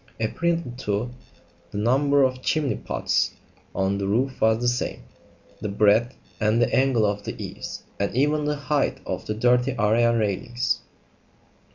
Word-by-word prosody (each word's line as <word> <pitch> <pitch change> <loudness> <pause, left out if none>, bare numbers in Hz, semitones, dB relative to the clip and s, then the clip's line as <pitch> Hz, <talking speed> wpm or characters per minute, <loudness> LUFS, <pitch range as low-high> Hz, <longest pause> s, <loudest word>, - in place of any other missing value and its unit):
Apparently, 165 +6 -1
too, 110 0 -2 0.6
the 100 - -6
number 140 +6 +3
of 130 -1 0
chimney 150 0 0
pots - - -1 0.4
on 95 +1 0
the 100 - -1
roof 125 +6 0
was 110 0 +4
the 120 - 0
same; 120 - -1 0.6
the 105 - -3
breadth 105 +5 +3 0.2
and 110 +2 +3
angle 130 -4 +3
of 105 0 -1
the - - -6
eaves; - - -7 0.2
and 100 +2 -1
even 150 +3 +2
the 150 0 0
height 145 0 0
of - - -4
the 105 - -2
dirty 125 +3 +2
area 115 +2 +3
railings. 115 +3 -1
120 Hz, 150 wpm, -24 LUFS, 105-135 Hz, 0.6 s, was